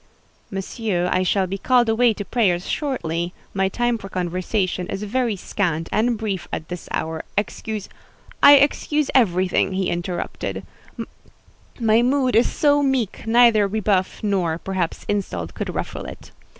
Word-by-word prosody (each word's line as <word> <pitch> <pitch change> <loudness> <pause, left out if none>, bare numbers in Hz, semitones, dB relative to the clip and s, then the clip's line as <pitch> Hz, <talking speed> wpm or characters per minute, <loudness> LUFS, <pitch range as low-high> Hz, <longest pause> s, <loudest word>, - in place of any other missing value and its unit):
"Monsieur, 195 -2 -2
I 185 - +2
shall 190 +1 +1
be 195 +2 -4
called 245 +2 +3
away 230 +2 +4
to 205 - -5
prayers 190 -7 +1
shortly; 175 - -2 0.2
my 190 -1 +1
time 240 +2 0
for 195 - -9
conversation 185 +1 -2
is 195 +1 -4
very 235 +1 0
scant 170 -4 -2
and 235 +2 +1
brief 205 -5 -3
at 155 - -5
this 180 -1 -7
hour—excuse——" 205 +5 -3 0.5
"I 285 - +10
excuse 295 +1 +2
everything," 190 -5 +2
he 190 -1 0
interrupted; 175 +1 -4 1.1
"my 225 -1 +4
mood 255 +1 +2
is 230 - +4
so 290 -1 +3
meek, 265 -8 -1
neither 225 -3 +5
rebuff 200 -2 0
nor, 185 -6 0
perhaps, 185 -1 -3
insult 95 - -2
could - - -5
ruffle - - -4
it. - - -10
200 Hz, 140 wpm, -22 LUFS, 180-235 Hz, 1.1 s, I